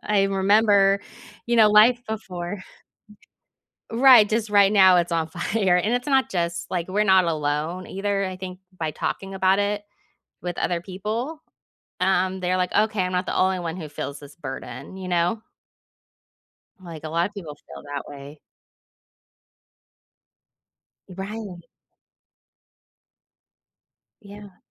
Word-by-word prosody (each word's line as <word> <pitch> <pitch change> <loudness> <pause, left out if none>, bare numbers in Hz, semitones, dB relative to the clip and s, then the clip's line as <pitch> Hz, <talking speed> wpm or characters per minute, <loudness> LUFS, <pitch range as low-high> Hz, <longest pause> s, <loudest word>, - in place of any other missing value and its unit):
I 205 -2 +2
remember, 195 0 +3 0.5
you 235 0 +1
know, 220 -2 +7
life 225 +4 +6
before. 185 -3 -5 1.3
Right. 240 -3 +7
Just 220 0 -1
right 200 0 +5
now, 190 -3 +6
it's 175 -1 +1
on 160 -1 0
fire, 190 +2 0
and 210 +6 +1
it's 245 +2 -2
not 270 -2 +2
just 170 -1 -3
like, 175 -1 -2
we're 205 +3 +1
not 190 -2 +5
alone, 155 +3 -2
either. 195 0 -2
I 185 -1 -5
think, 185 -1 -8 0.2
by 160 -3 -2
talking 195 +5 -4
about 190 +1 +2
it 205 0 -1 0.6
with 175 -1 -5
other 175 -1 -1
people, 215 - -5 0.6
um, 190 0 +1
they're 185 0 0
like, 180 0 -1
"Okay. 215 -1 +2
I'm 180 0 -2
not 180 +1 0
the - - -2
only 185 0 +2
one 170 -1 -4
who 160 -4 -7
feels 145 -1 -6
this 145 0 -14
burden," 140 +4 -8
you 185 - -6
know? 175 +5 0 1.4
Like, 165 -4 -10
a - - -4
lot 170 +2 0
of 205 - -11
people 165 -7 -8
feel - - -13
that 145 -1 -6
way. 145 +1 -11 2.7
Right. 195 0 -7 2.6
Yeah. 205 -2 -13
190 Hz, 135 wpm, -23 LUFS, 175-205 Hz, 2.7 s, know